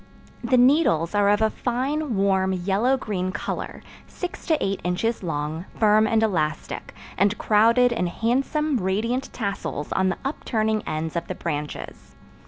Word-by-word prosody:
The 255 - +3
needles 245 - +4
are 205 -1 +3
of 205 +1 +3
a 220 - +2
fine, 260 +2 -2
warm, 190 -1 +2
yellow 200 +8 +1
green 190 -7 -3
color, - - -5 0.2
six 360 - -7
to 320 -3 +3
eight 195 0 -1
inches 200 +6 -1
long, 160 0 -3
firm 215 0 +5
and 225 0 +2
elastic, 160 -7 -2 0.2
and 200 +2 +3
crowded 230 +4 +4
in 225 -6 0
handsome, 270 - 0
radiant 225 +7 -1
tassels 200 - -4
on 190 0 +2
the 185 - -2
upturning 220 -6 -1
ends 155 +1 -3
of 170 - -2
the 185 - -4
branches. 150 -4 -6
210 Hz, 150 wpm, -24 LUFS, 185-245 Hz, 0.2 s, firm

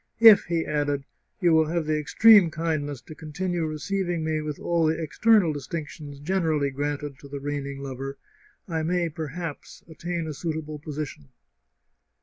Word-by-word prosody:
" - - -46
If," 225 -3 +9
he 165 -1 -1
added, 145 -2 -1 0.2
" - - -49
you 175 -2 +4
will 160 -1 +4
have 165 0 -1
the 155 0 +1
extreme 195 +5 +6
kindness 155 -4 -2
to 160 - -11
continue 165 +2 -3
receiv 175 +5 -2
ing 170 -2 -1
me 155 -1 0
with 150 -1 -4
all 170 -2 +1
the 160 +1 0
external 180 +2 +3
distinctions 150 -1 -6
generally 155 -3 0
granted 145 0 -3
to 140 - -12
the 140 0 -6
reigning 140 -1 -4
lover, 135 +1 -5 0.5
I 165 -3 -1
may, 170 +1 0
perhaps, 160 0 -6
attain 170 +1 -4
a 155 - -4
suitable 155 -1 -4
position." 145 - -6
155 Hz, 165 wpm, -26 LUFS, 145-170 Hz, 0.5 s, If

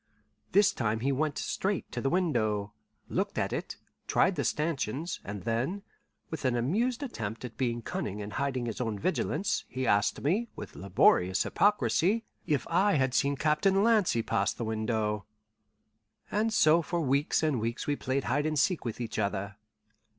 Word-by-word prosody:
This 200 0 +5
time 110 -2 -1
he 135 +3 +1
went 150 +2 0
straight 195 -1 -2
to - - -3
the 135 - +1
window, 110 - 0 0.3
looked - - -2
at - - 0
it, - - -4 0.3
tried - - +3
the - - -1
stanchions, 150 0 -1
and 105 -1 -6
then, 130 - -1 0.5
with 160 - -5
an 130 -2 +2
amused 225 - 0
attempt 115 - -5
at 115 - -8
being 120 -2 -1
cunning 105 -1 -4
and 105 0 -6
hiding 130 -2 -1
his 115 +1 -4
own 115 -4 -2
vigilance, 185 - 0
he 130 0 -3
asked 100 -2 +2
me, 205 +11 +1
with - - -8
laborious 95 -1 +3
hypocrisy, 200 - +2 0.2
if 145 -6 +1
I 190 +4 +3
had 130 -3 +1
seen 140 +2 +2
Captain 160 +7 +2
Lancy 210 - +3
pass 100 -1 +1
the 115 - -4
window. 110 -1 -1 1.1
And 215 +2 +1
so 165 -5 +5
for 170 +1 -2
weeks 140 +2 +1
and 150 -6 +1
weeks 115 +2 -3
we 145 - 0
played 135 0 -1
hide 145 +6 0
and 155 -1 -1
seek 180 +4 +2
with 115 -1 -4
each 115 -3 -3
other. 100 -1 -2
135 Hz, 170 wpm, -29 LUFS, 110-170 Hz, 1.1 s, This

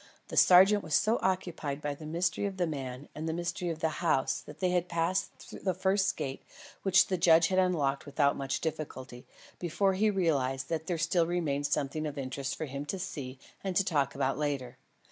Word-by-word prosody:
The - - -6
sergeant 190 +3 +7
was 155 - -1
so 225 +2 +3
occupied 175 -6 -2
by 145 -1 -3
the 150 +2 -9
mystery 175 +5 0
of 195 -1 -6
the 180 - +1
man 135 -3 -5
and 160 +1 -4
the - - -1
mystery 175 +1 -3
of 160 -1 -5
the 160 - +2
house 155 -6 +1
that 150 +1 -12
they 185 -1 +1
had 180 0 0
passed 170 +3 -2
the 185 -3 0
first 190 +1 +1
gate 135 -1 -4 0.4
(which 190 -1 +5
the 185 -2 -2
judge 170 -1 +5
had 190 0 +2
unlocked 150 -7 +1
without 140 0 +2
much 135 -1 -3
difficulty) 145 -6 -5 0.3
before 190 +3 +1
he 210 +3 +2
realised 140 -9 0
that 160 -1 -2
there 175 - -1
still 170 +1 +2
remained 150 -5 -1
something 155 +3 -1
of 145 -1 -6
interest 135 0 -3
for 155 - -4
him 140 0 -5
to 195 - -2
see 140 -8 -6 0.3
and 190 -2 -2
to 195 - +4
talk 140 -6 0
about 135 +1 0
later. 140 -5 -3
160 Hz, 205 wpm, -30 LUFS, 140-180 Hz, 0.4 s, sergeant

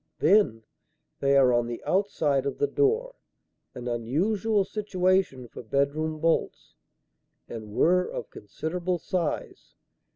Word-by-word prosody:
"Then, 155 - +3 0.6
they 140 0 +3
are 130 -2 +5
on 120 0 +1
the 120 0 -6
outside 155 -8 +1
of - - -3
the - - +2
door 450 +4 +1 0.6
an 125 0 -6
unusual 190 - 0
situation 185 - 0
for - - -10
bedroom 140 +6 -1
bolts 165 +1 -1 0.7
and 110 -3 -8
were 180 +2 +3
of - - -6
considerable 175 - -3
size. 170 -2 -4
160 Hz, 120 wpm, -27 LUFS, 125-190 Hz, 0.7 s, are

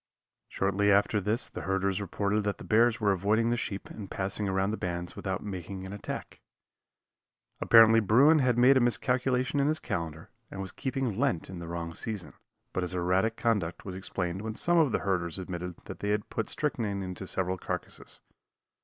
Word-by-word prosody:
Shortly 100 +1 +1
after 100 +1 +3
this 105 +5 -1
the - - -7
herders 95 +1 0
reported 100 +2 -1
that 105 0 -1
the - - -10
bears 115 +2 +3
were 105 -3 +3
avoiding 105 +5 +2
the - - +2
sheep 100 -4 -4
and 100 -3 -9
passing 100 +1 -2
around 95 +1 +1
the 110 - -2
bands 85 -2 -4
without 95 -2 -3
making 95 -1 -6
an 95 - -7
attack. 105 - -6 1.2
Apparently 115 0 +7
bruin 130 +10 +5
had 125 -3 +2
made 130 +3 +6
a - - +6
miscalculation 125 +2 +1
in 140 - +3
his 155 +1 +1
calendar 80 - -5 0.2
and 95 - -8
was 95 -1 -4
keeping 130 -5 -2
Lent 125 - 0
in 90 - -7
the 85 - -7
wrong 85 0 -4
season, 105 +1 -4 0.4
but 95 - -1
his 90 0 -3
erratic 90 +5 +1
conduct 105 -8 -1
was 95 -2 -5
explained 95 -1 -3
when 110 0 -4
some 175 +6 +3
of 150 -6 +4
the - - +2
herders 90 -3 0
admitted 90 -1 -5
that - - -8
they 105 - -2
had 105 0 -1
put 115 - -2
strychnine 110 -9 -1
into 95 0 -6
several 95 0 -2
carcasses. - - -5
100 Hz, 190 wpm, -29 LUFS, 95-115 Hz, 1.2 s, Apparently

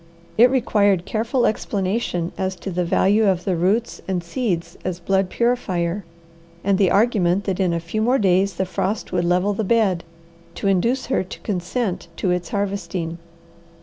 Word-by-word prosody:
It 240 +3 +7
required 205 -8 +2
careful 230 +4 0
explanation 195 -4 -1
as 190 0 -2
to 190 +2 -6
the 180 0 0
value 205 +5 +3
of 185 -2 +1
the 190 - +1
roots 195 +7 0
and 185 -2 -1
seeds 170 -4 -2
as 180 -1 -3
blood 190 +1 +1
purifier, 195 -7 0 0.6
and 195 0 +2
the 195 -3 +4
argument 200 -4 +2
that 190 -2 -2
in 185 -2 +2
a 170 - 0
few 170 +6 -3
more 245 +4 +3
days 195 -2 +2
the 190 - -1
frost 195 +3 -2
would 175 -1 0
level 180 +4 +2
the 220 - -2
bed, 200 -5 +2 0.5
to - - -2
induce 230 +8 +1
her 260 - 0
to 185 - -9
consent 190 0 -2
to 185 - 0
its 180 -1 -1
harvesting. 195 -4 -3
190 Hz, 170 wpm, -22 LUFS, 180-215 Hz, 0.6 s, It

